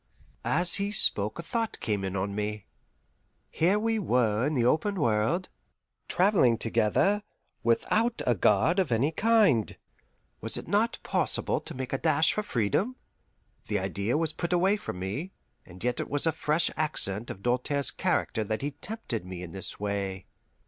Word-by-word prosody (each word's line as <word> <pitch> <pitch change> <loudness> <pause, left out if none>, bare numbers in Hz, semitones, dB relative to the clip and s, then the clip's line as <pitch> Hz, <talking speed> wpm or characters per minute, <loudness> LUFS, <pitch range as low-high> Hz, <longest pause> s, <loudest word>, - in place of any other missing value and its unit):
As 175 +1 +2
he 200 0 -1
spoke 105 - +3
a 170 - -5
thought 225 +5 -2
came 105 -3 -2
in 95 0 -3
on 100 +1 -2
me. 105 0 -3 0.9
Here 180 +6 +2
we 225 +1 0
were 120 - +1
in 155 - -1
the 120 -3 +2
open 200 - +2
world, 120 - +1 0.6
travelling 180 - +3
together, 115 - +1 0.4
without 220 - +1
a 125 - +3
guard 105 - +3
of 180 -9 0
any 125 +7 +2
kind. 205 - +3 0.6
Was - - -4
it - - -7
not - - +1
possible - - 0
to - - -7
make 130 0 -5
a 135 - 0
dash 160 -1 +3
for 215 - -1
freedom? 195 - 0 0.7
The 105 - 0
idea 100 +6 -1
was 165 0 0
put 170 - -4
away 190 +3 +3
from 205 - -6
me, 105 - -4 0.3
and 90 +2 -10
yet 125 0 0
it - - -3
was 145 +2 +1
a 160 - +3
fresh 160 +2 0
accent 120 -8 +1
of 100 - -8
Doltaire's 125 +3 0
character 110 - 0
that 110 +4 -3
he 145 - -1
tempted 145 - -5
me 90 -1 -7
in 85 - -8
this 95 0 -4
way. 100 -2 -3
130 Hz, 170 wpm, -28 LUFS, -, 0.9 s, spoke